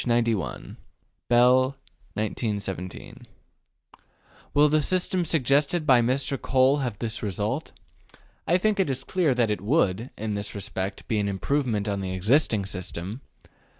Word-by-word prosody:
91). 115 -5 -1 0.5
Bell, 125 +2 +6 0.5
1917. 100 -4 -4 1.3
Will 145 +1 +6
the 155 +1 +2
system 185 +3 +1
suggested 150 +1 +2
by 125 -4 +6
Mr. 130 +2 -1
Cole 130 +2 +3
have 125 -7 -3
this 115 0 -3
result? 105 - -2 0.8
I 175 - +4
think 210 +2 +1
it 190 - +2
is 130 - -2
clear 170 -8 +1
that 120 -3 +2
it 105 - -2
would, 110 - +1
in 110 0 -3
this 100 +1 -4
respect, 100 -1 -4
be 110 - 0
an 100 -1 0
improvement 110 +1 -1
on 100 -1 -1
the 95 -1 -3
existing 105 - +2
system. 95 +4 -6
120 Hz, 135 wpm, -26 LUFS, 100-140 Hz, 1.3 s, Bell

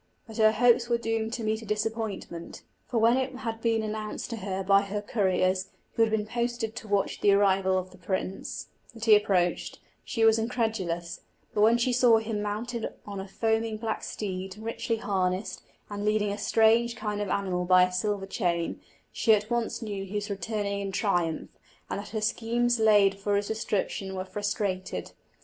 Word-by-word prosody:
But 220 -2 -10
her 215 -1 +5
hopes 235 +1 +4
were 235 - +3
doomed 225 -1 -1
to 235 - -3
meet 220 +1 0
a - - -9
disappointment, 210 -5 -3 0.2
for 240 - -2
when 230 +2 +5
it 260 0 -2
had 225 -3 -5
been 225 -1 +1
announced 215 +2 -4
to 230 - -3
her 195 -2 -3
by 195 +1 +5
her 200 +1 -3
couriers, 190 -3 +1 0.2
who - - 0
had 225 - +5
been 215 -1 0
posted 235 0 -2
to 220 - -7
watch 200 -1 0
the 205 - +5
arrival 190 -1 +3
of 185 0 -3
the 185 - -16
prince, 185 +1 -4 0.3
that 225 0 -5
he 220 -2 +8
approached, 190 -4 +1 0.3
she 225 -2 +1
was 225 0 +5
incredulous; 220 -8 -2 0.3
but 210 - +1
when 225 +2 +6
she 245 +1 +1
saw 240 -2 +6
him 220 -1 -2
mounted 225 +3 -3
on 200 -1 -6
a 190 - -6
foaming 225 +2 0
black 220 0 -3
steed, 190 -1 -5
richly 230 +1 -2
harnessed, 190 -2 -1 0.3
and 205 0 -5
leading 210 -1 +1
a 205 - -3
strange 225 +3 +3
kind 210 -3 -3
of 205 - -2
animal 185 -2 0
by 180 0 +6
a 180 - +1
silver 195 +2 -1
chain, 175 -4 -1 0.3
she 220 -2 +4
at 210 +2 -4
once 235 0 -1
knew 200 -3 -4
he 195 +2 -8
was 205 0 -2
returning 200 0 -2
in 195 -1 -3
triumph, 175 -5 0 0.4
and - - -2
that 205 - -8
her 220 -1 -3
schemes 235 +2 +1
laid 205 -3 +5
for 205 +1 0
his 200 0 -1
destruction 200 -3 -2
were 185 0 -3
frustrated. 205 -2 -3
210 Hz, 190 wpm, -28 LUFS, 195-225 Hz, 0.4 s, he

